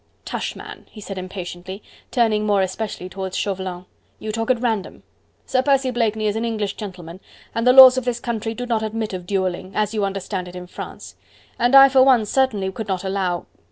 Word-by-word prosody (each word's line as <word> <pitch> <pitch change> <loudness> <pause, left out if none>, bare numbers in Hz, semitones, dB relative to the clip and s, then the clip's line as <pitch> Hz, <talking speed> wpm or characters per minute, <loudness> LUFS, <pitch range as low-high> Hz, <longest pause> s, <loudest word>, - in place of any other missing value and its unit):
"Tush, - - -4
man!" - - -11
he 215 - -13
said 195 -2 -6
impatiently, 185 +1 -7 0.3
turning 220 -4 +2
more 205 -2 +2
especially 190 -1 -4
towards 190 0 -5
Chauvelin, 185 -2 -3 0.3
"you 215 - -5
talk 225 +3 -3
at 255 -2 +3
random. 225 -5 -2 0.4
Sir 255 - +1
Percy 270 -1 +2
Blakeney 220 -3 0
is 210 0 0
an 225 - -2
English 215 -3 -2
gentleman, 180 -4 -9 0.3
and 230 +2 -1
the - - +8
laws 260 0 +9
of 255 - -10
this 240 -1 -1
country 225 -2 -3
do 245 - -4
not 230 -3 0
admit 220 -1 -3
of 180 -1 -6
duelling, 185 -1 -2
as 210 0 0
you 210 -2 -1
understand 195 -1 -3
it 180 - -10
in 180 0 -7
France; 100 - -9 0.4
and 245 +3 +3
I 275 0 +10
for 265 -1 +4
one 255 -4 +5
certainly 210 -5 0
could 220 +2 -6
not 190 -2 -2
allow..." 190 -2 -2
210 Hz, 200 wpm, -21 LUFS, 190-235 Hz, 0.4 s, I